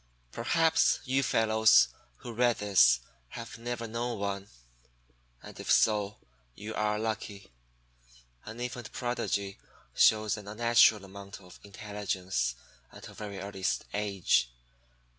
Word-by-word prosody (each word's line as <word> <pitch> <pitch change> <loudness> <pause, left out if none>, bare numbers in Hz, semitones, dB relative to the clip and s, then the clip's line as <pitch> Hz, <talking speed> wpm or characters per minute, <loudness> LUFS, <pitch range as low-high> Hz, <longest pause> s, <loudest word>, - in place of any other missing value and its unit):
Perhaps 160 +7 +2
you 130 +2 +1
fellows 110 -3 +4 0.3
who 120 - -7
read 120 0 +2
this 90 -13 +4 0.3
have 115 - -9
never 120 0 -4
known 115 +1 -3
one; 100 -1 -4 0.9
and - - -12
if - - -2
so, 105 -2 +2 0.4
you 105 +2 -7
are 105 -1 0
lucky. 105 - -5 0.9
An 110 +2 -9
infant 120 -1 -5
Prodigy 100 -5 -3 0.3
shows 110 0 +3
an 105 -1 -10
unnatural 110 -1 +4
amount 100 0 -10
of 90 -2 -16
intelligence 95 - -3 0.4
at - - -11
a - - -13
very 100 -2 -7
early 95 0 -8 0.3
age. 100 -12 +1
105 Hz, 120 wpm, -29 LUFS, 100-115 Hz, 0.9 s, fellows